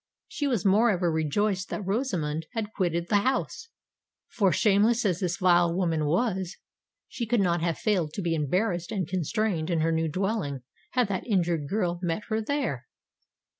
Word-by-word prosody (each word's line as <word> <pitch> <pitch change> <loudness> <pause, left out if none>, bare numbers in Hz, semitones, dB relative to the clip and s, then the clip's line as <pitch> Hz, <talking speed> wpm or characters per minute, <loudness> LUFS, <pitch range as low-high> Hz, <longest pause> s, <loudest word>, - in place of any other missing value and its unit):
She 290 -4 -2
was 235 -9 0
moreover 195 -3 +3
rejoiced 185 +5 0
that 205 - -4
Rosamond 180 - -1
had 220 -2 -3
quitted 170 -2 -1
the 205 - +3
house;—for, 255 - -3
shameless 215 +6 +3
as 180 -4 +1
this 180 -2 -1
vile 175 -2 +4
woman 165 -4 0
was, 185 +1 0 0.5
she 235 - -5
could 240 +1 +2
not 175 -3 +1
have 170 -1 0
failed 200 -9 0
to 200 - -4
be 170 -1 0
embarrassed 175 +4 -1
and 190 -7 -2
constrained 180 0 -1
in 165 -2 +1
her 165 +1 +2
new 160 0 +1
dwelling, 185 - -2 0.3
had 250 -3 +2
that 190 +3 -3
injured 170 -8 0
girl 180 -4 -1
met 175 +3 -2
her 220 0 0
there! 220 - -2
185 Hz, 165 wpm, -27 LUFS, 165-215 Hz, 0.5 s, vile